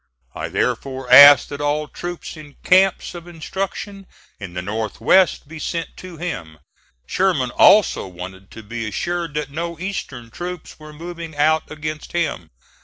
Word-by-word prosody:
I -, -, -4 dB
therefore 130 Hz, -2 st, -2 dB
asked 140 Hz, +1 st, +10 dB
that 145 Hz, 0 st, -6 dB
all 150 Hz, +1 st, 0 dB
troops 175 Hz, +3 st, -7 dB
in 150 Hz, -2 st, -13 dB
camps 190 Hz, +1 st, +3 dB
of 175 Hz, 0 st, -10 dB
instruction 190 Hz, +3 st, -6 dB, 0.3 s
in 95 Hz, -4 st, -8 dB
the 90 Hz, -, -2 dB
North 105 Hz, +2 st, -4 dB
west 190 Hz, -5 st, +3 dB
be 160 Hz, +1 st, -9 dB
sent 165 Hz, +2 st, -4 dB
to 185 Hz, -2 st, -10 dB
him. 90 Hz, -, -6 dB, 0.5 s
Sherman 175 Hz, -, 0 dB
also 205 Hz, -, +5 dB
wanted 95 Hz, +1 st, -10 dB
to 110 Hz, -, -11 dB
be 115 Hz, +1 st, -5 dB
assured 170 Hz, -, -3 dB
that 150 Hz, -2 st, -3 dB
no 170 Hz, +2 st, -4 dB
Eastern 135 Hz, -11 st, -6 dB
troops 175 Hz, +3 st, -7 dB
were 155 Hz, 0 st, -11 dB
moving 165 Hz, 0 st, -8 dB
out 155 Hz, +2 st, +2 dB
against 155 Hz, 0 st, -6 dB
him. 160 Hz, -, -2 dB
155 Hz, 155 wpm, -20 LUFS, 125-175 Hz, 0.5 s, asked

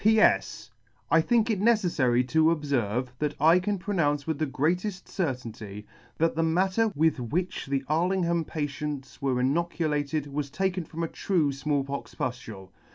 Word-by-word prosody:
<c 220 Hz, +2 st, +6 dB
P. -, -, +4 dB
S. -, -, +2 dB, 0.4 s
I 165 Hz, -, +6 dB
think 230 Hz, +4 st, +2 dB
it 200 Hz, -3 st, -1 dB
neceffary 165 Hz, -, +2 dB
to 160 Hz, 0 st, +3 dB
obferve, 130 Hz, -7 st, 0 dB
that 150 Hz, -1 st, -1 dB
I 165 Hz, +5 st, +6 dB
can 200 Hz, +2 st, -1 dB
pronounce 155 Hz, -7 st, 0 dB
with 160 Hz, -3 st, -2 dB
the 155 Hz, -, 0 dB
greateft 180 Hz, +8 st, -1 dB
certainty, 115 Hz, -, -4 dB, 0.3 s
that 165 Hz, +1 st, +2 dB
the 165 Hz, -, +1 dB
matter 190 Hz, +7 st, +2 dB
with 160 Hz, -1 st, +2 dB
which 165 Hz, +10 st, -2 dB
the 135 Hz, 0 st, -1 dB
Arlingham 170 Hz, +1 st, +1 dB
patients 145 Hz, -2 st, -5 dB
were 130 Hz, -2 st, +1 dB
inoculated 150 Hz, +1 st, 0 dB
was 145 Hz, 0 st, -4 dB
taken 180 Hz, +3 st, -1 dB
from 165 Hz, +2 st, -5 dB
a -, -, 0 dB
true 160 Hz, -5 st, 0 dB
Small 140 Hz, +1 st, -1 dB
pox 140 Hz, +1 st, -6 dB
pudule. 115 Hz, -7 st, -5 dB
155 Hz, 160 wpm, -27 LUFS, 135-175 Hz, 0.4 s, <c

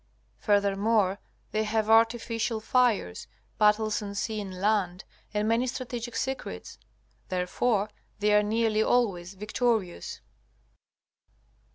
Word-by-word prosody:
Furthermore, 200 Hz, -1 st, +2 dB, 0.3 s
they 215 Hz, 0 st, +1 dB
have 215 Hz, 0 st, 0 dB
artificial 225 Hz, 0 st, +2 dB
fires, 220 Hz, -, +1 dB, 0.3 s
battles 215 Hz, +1 st, +3 dB
on 200 Hz, -1 st, -6 dB
sea 215 Hz, +1 st, -2 dB
and 190 Hz, -2 st, -7 dB
land, 195 Hz, -3 st, +1 dB, 0.3 s
and 210 Hz, 0 st, 0 dB
many 230 Hz, +3 st, +2 dB
strategic 240 Hz, -2 st, -5 dB
secrets. 255 Hz, -, -4 dB, 0.5 s
Therefore 195 Hz, +4 st, 0 dB, 0.3 s
they 210 Hz, 0 st, +2 dB
are 210 Hz, -, +6 dB
nearly 220 Hz, +1 st, +1 dB
always 195 Hz, -7 st, +1 dB
victorious. 220 Hz, -, -1 dB
215 Hz, 100 wpm, -28 LUFS, 200-230 Hz, 0.5 s, are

